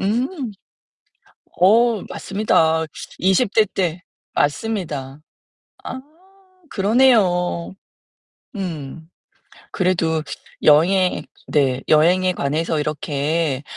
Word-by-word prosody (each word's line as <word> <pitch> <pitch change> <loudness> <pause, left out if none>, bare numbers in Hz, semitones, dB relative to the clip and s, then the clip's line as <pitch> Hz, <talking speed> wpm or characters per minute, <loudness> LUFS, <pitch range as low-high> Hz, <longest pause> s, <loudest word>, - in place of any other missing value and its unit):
음. 230 +7 0 1.3
어 225 +2 +4
맞습니다. 160 -6 +1 0.3
20 190 +4 +2
대 220 -1 +4
때 180 -3 -2 0.3
맞습니다. 145 -5 -2 0.6
아 260 - -6 0.7
그러네요. 195 -6 +2 0.8
음. 160 -4 -6 0.6
그래도 170 -4 0 0.4
여행 170 +2 +4 0.2
네 135 -3 +1
여행에 180 +4 +4
관해서 155 +3 -1
이렇게 150 -1 -2
170 Hz, 145 characters per minute, -20 LUFS, 150-195 Hz, 1.3 s, 어